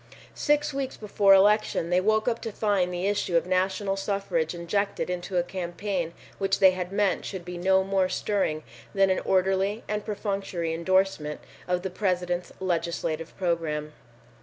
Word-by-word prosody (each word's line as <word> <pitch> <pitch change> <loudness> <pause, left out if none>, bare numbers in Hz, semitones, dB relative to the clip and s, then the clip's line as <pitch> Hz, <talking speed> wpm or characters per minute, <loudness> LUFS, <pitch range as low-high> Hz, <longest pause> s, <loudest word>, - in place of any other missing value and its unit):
Six 295 0 +1
weeks 270 -1 -3
before 200 -2 +4
election 205 -3 +3
they 180 +1 +4
woke 215 +3 +2
up 235 -1 0
to 225 - -4
find 200 -4 +1
the 180 +1 -2
issue 200 -3 +1
of 170 - +1
national 190 +2 0
suffrage 195 -5 -1
injected 180 +2 -1
into 180 +1 -3
a 175 - +3
campaign 175 -1 -3 0.3
which 195 0 +1
they 190 -2 +7
had 180 0 -4
meant 200 -1 +1
should 185 -3 -6
be 180 0 -6
no 190 +2 +3
more 190 -1 +1
stirring 185 -8 -1 0.3
than 195 -1 +4
an 185 - +1
orderly 190 +3 +1
and 210 0 -2
perfunctory 195 -5 -3
endorsement 170 -3 +1 0.3
of 180 0 0
the 190 - -3
President's 180 -2 -1
legislative 170 -3 -2
program. 160 -4 -1
190 Hz, 160 wpm, -27 LUFS, 175-200 Hz, 0.3 s, they